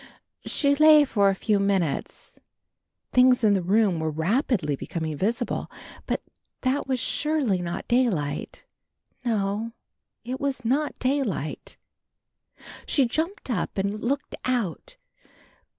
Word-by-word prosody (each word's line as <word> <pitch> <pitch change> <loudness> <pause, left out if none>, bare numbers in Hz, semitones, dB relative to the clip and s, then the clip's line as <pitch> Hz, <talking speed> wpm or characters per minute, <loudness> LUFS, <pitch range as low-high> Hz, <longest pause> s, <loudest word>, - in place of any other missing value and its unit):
She 280 -1 +2
lay 305 0 +7
for 200 -6 +3
a 195 - +1
few 205 +1 +1
minutes, 195 -6 -1 0.7
things 250 -1 +5
in 210 -2 +5
the 195 - +1
room 195 -1 +2
were 160 0 -1
rapidly 165 - 0
becoming 160 +2 -4
visible, 230 - -2 0.4
but - - -1 0.4
that 265 +2 0
was 260 -2 0
surely 265 -7 0
not 170 -1 -4
daylight; 190 - 0 0.6
no, 220 -1 -1 0.5
it 255 +2 -4
was 270 -3 -2
not 285 +6 0
daylight. 255 - -2 1.1
She 275 - +3
jumped 315 - -2
up 205 -3 -2
and 200 +2 -1
looked 280 +5 -2
out. 235 - -2
225 Hz, 120 wpm, -25 LUFS, 190-265 Hz, 1.1 s, lay